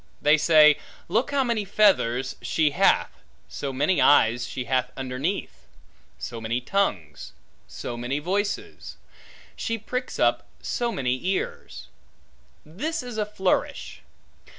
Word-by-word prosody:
They 150 Hz, +1 st, +5 dB
say, 155 Hz, -1 st, +6 dB, 0.3 s
look 225 Hz, +9 st, +1 dB
how 280 Hz, -1 st, +1 dB
many 235 Hz, -4 st, 0 dB
feathers 160 Hz, -, +2 dB
she 155 Hz, -2 st, +1 dB
hath, 140 Hz, -, +2 dB, 0.3 s
so 140 Hz, -, -5 dB
many 145 Hz, +6 st, +1 dB
eyes 120 Hz, -3 st, +4 dB
she 130 Hz, -, -4 dB
hath 125 Hz, 0 st, 0 dB
underneath; 135 Hz, +8 st, -4 dB, 0.5 s
so 115 Hz, -2 st, -6 dB
many 115 Hz, +2 st, -1 dB
tongues; 100 Hz, -, -2 dB, 0.3 s
so 120 Hz, -, -6 dB
many 120 Hz, +4 st, -3 dB
voices; 200 Hz, +7 st, -3 dB, 0.6 s
she 230 Hz, -1 st, -2 dB
pricks 250 Hz, +4 st, -5 dB
up -, -, +1 dB
so 240 Hz, -1 st, -2 dB
many 130 Hz, -, -2 dB
ears. 190 Hz, 0 st, -4 dB, 0.8 s
This 300 Hz, -, -4 dB
is 245 Hz, -3 st, -6 dB
a 210 Hz, -, -1 dB
flourish. 190 Hz, -3 st, -2 dB
155 Hz, 125 wpm, -25 LUFS, 125-210 Hz, 0.8 s, say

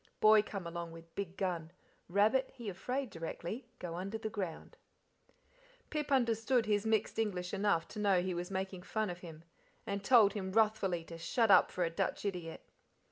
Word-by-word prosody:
Boy 215 Hz, 0 st, +7 dB
come 200 Hz, -3 st, -6 dB
along 170 Hz, 0 st, -5 dB
with 165 Hz, 0 st, -13 dB
big 195 Hz, -2 st, -5 dB
gun, 170 Hz, -4 st, -2 dB, 0.4 s
rabbit 215 Hz, +8 st, +3 dB
he 235 Hz, -5 st, -5 dB
afraid 250 Hz, +6 st, -3 dB
directly, 170 Hz, +8 st, -5 dB
go 175 Hz, -2 st, -5 dB
under 195 Hz, +5 st, -4 dB
the 220 Hz, -1 st, -4 dB
ground." 190 Hz, -7 st, -5 dB, 1.2 s
Pip 300 Hz, -2 st, -2 dB
understood 235 Hz, -1 st, +2 dB
his 210 Hz, 0 st, +1 dB
mixed 220 Hz, 0 st, +1 dB
English 185 Hz, -5 st, -1 dB
enough 200 Hz, -5 st, +1 dB
to 210 Hz, -, -7 dB
know 200 Hz, -3 st, +4 dB
he 185 Hz, 0 st, -1 dB
was 175 Hz, +1 st, -4 dB
making 190 Hz, -1 st, -3 dB
fun 215 Hz, +1 st, -2 dB
of 175 Hz, -, -8 dB
him, 165 Hz, -3 st, -10 dB, 0.4 s
and 200 Hz, 0 st, -3 dB
told 215 Hz, -3 st, +6 dB
him 190 Hz, -2 st, -4 dB
wrathfully 210 Hz, -6 st, +2 dB
to 165 Hz, 0 st, -10 dB
"shut 225 Hz, +5 st, +2 dB
up 185 Hz, -, +7 dB
for 180 Hz, -, -1 dB
a 165 Hz, -, 0 dB
Dutch 165 Hz, -, -2 dB
idiot." 175 Hz, -5 st, -4 dB
195 Hz, 180 wpm, -34 LUFS, 175-220 Hz, 1.2 s, Boy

